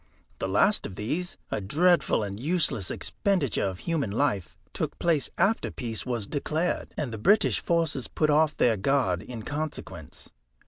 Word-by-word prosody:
The - - -1
last 195 - +3
of 95 - -10
these, 155 - -3
a - - -1
dreadful 165 - +3
and 100 0 -5
useless 150 - +1
expenditure 180 - 0
of 95 -2 -3
human 160 -9 -1
life, 105 - -1 0.2
took - - -3
place 160 -5 +1
after 200 +6 +2
peace 115 0 -5
was 120 -4 -2
declared, 155 - -2
and 140 -6 -2
the 110 - -5
British 205 - +4
forces 165 - 0
put 155 -1 +1
off 155 +1 +3
their 115 -3 +3
guard 100 -5 +1
in 120 -3 -8
consequence. 145 - -6
140 Hz, 155 wpm, -27 LUFS, 105-165 Hz, 0.2 s, British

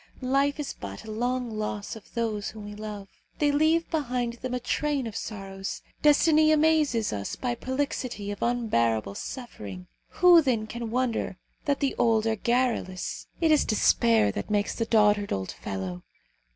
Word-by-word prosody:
Life 275 +3 +1
is 295 - -3
but 100 0 -8
a 220 - -6
long 245 +2 -1
loss 210 0 -3
of 220 - -13
those 220 -3 -1
whom 215 -1 -9
we 210 - -7
love. 210 -1 -7 0.3
They 290 -1 +3
leave 315 +3 +3
behind 250 -6 -1
them 250 +1 -4
a - - -1
train 280 +2 -1
of 220 -3 -6
sorrows. 195 -3 -5 0.2
Destiny 310 +1 +5
amazes 305 - +3
us 100 -1 -3
by 250 - -2
a - - -1
prolixity 255 -5 -3
of 205 - -7
unbearable 115 - +1
suffering; 100 - -7 0.2
who 355 -2 +7
then 245 -7 0
can 235 +1 -5
wonder 235 -5 -1 0.3
that 285 0 0
the 275 - +1
old 225 -2 +3
are 225 0 +1
garrulous? 235 -5 -1
It 325 -1 +4
is 305 - +5
despair 115 - +3
that 100 - -5
makes 205 -1 +1
the 230 - -1
dotard, 210 -2 +3
old 95 -1 -2
fellow! 95 -2 -5
230 Hz, 165 wpm, -27 LUFS, 205-270 Hz, 0.3 s, who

